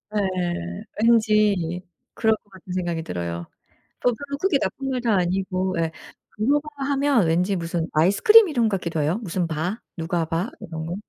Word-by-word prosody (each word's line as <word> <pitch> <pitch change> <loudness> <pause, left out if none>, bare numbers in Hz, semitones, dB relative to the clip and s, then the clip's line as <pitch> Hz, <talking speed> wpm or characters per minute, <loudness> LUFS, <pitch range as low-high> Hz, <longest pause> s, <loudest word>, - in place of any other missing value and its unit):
예. 175 - -2 0.2
왠지 210 -6 +3 0.3
그럴 220 -1 +2
것 205 - -31
같은 190 -1 -12
생각이 175 -3 -2
들어요. 85 - -4 0.6
또 245 - +3
별로 280 +4 -5
크게 335 -3 +2
나쁜 270 0 -3
말도 245 -3 0
아니고 185 0 0
예 165 -1 0 0.4
브로바 290 +7 +1 0.2
하면 275 -7 +3
왠지 180 +5 +2
무슨 165 -1 -2
아이스크림 270 - +6
이름 240 -7 +2
같기도 170 -5 -2
해요. 155 +8 +1
무슨 180 -2 -1
바, 165 +7 -3 0.2
누가바, 165 +4 -1
이런 160 -1 -6
거. 170 - -3
185 Hz, 310 characters per minute, -23 LUFS, 165-225 Hz, 0.6 s, 아이스크림